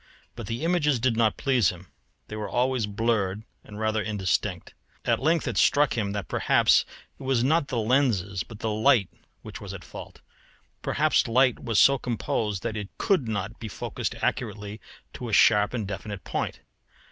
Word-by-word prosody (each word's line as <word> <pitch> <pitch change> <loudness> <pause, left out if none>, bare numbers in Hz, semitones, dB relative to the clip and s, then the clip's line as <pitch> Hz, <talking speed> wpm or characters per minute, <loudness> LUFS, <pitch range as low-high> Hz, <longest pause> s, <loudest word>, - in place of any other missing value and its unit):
But - - -7
the 115 +5 -4
images 155 -6 +2
did 120 0 +1
not 110 -2 +2
please 130 -8 +2
him; 90 0 -9 0.4
they 110 - -7
were 105 -1 -4
always 125 -2 0
blurred 105 -2 -1 0.2
and 105 0 -10
rather 110 0 0
indistinct. 105 -4 -2 0.3
At - - +2
length, 160 +3 +1
it - - -2
struck 145 -1 +3
him 105 -4 -1
that 100 -3 -4
perhaps - - +3 0.3
it - - -14
was 130 -3 +1
not 150 +2 +2
the 130 - -3
lenses 110 -6 +1
but 110 - -9
the 110 - -1
light 105 -2 +3 0.3
which - - -9
was - - -7
at - - -10
fault. - - -11 0.6
Perhaps 155 -2 +2
light 125 +1 +2
was 115 -3 +1
so 140 -1 +6
composed 110 -4 -2
that 115 -2 -3
it 105 -2 -5
could 185 - +1
not 110 +1 -3
be 115 - -6
focused 105 - -4
accurately 105 -2 -3 0.3
to 120 - -6
a - - -5
sharp 105 -1 +5
and 115 -5 -3
definite 100 0 -6
point. - - -3
110 Hz, 180 wpm, -26 LUFS, 105-130 Hz, 0.6 s, so